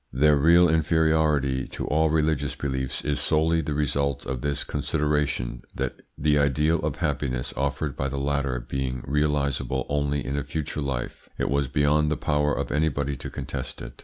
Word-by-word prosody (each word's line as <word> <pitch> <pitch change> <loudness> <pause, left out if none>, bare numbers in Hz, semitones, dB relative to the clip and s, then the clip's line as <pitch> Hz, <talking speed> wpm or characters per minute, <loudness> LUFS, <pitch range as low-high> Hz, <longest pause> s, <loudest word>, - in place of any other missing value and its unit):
Their 75 +4 +4
real 85 +5 +6
inferiority 80 -4 +2
to - - -5
all 80 +1 +2
religious 75 -2 +1
beliefs 65 -2 -3
is 75 -1 0
solely 80 +1 +2
the 75 -1 -3
result 70 -2 0
of 65 -1 -3
this 70 +1 -1
consideration, 75 -5 -1
that - - -3 0.2
the 75 0 +3
ideal 75 +4 +2
of 75 -2 -2
happiness 65 -3 -2
offered 70 +1 -1
by 70 - -1
the 70 - -4
latter 70 -2 0
being 65 0 -3
realisable 70 -2 0
only 70 0 0
in 70 - -2
a 70 - -1
future 75 +1 -4
life, 70 -4 -4
it - - -1
was 70 -1 +1
beyond 75 +3 +2
the - - 0
power 75 -1 +1
of - - -2
anybody 70 -2 0
to - - -6
contest - - -5
it. - - -9
70 Hz, 170 wpm, -25 LUFS, 70-75 Hz, 0.2 s, real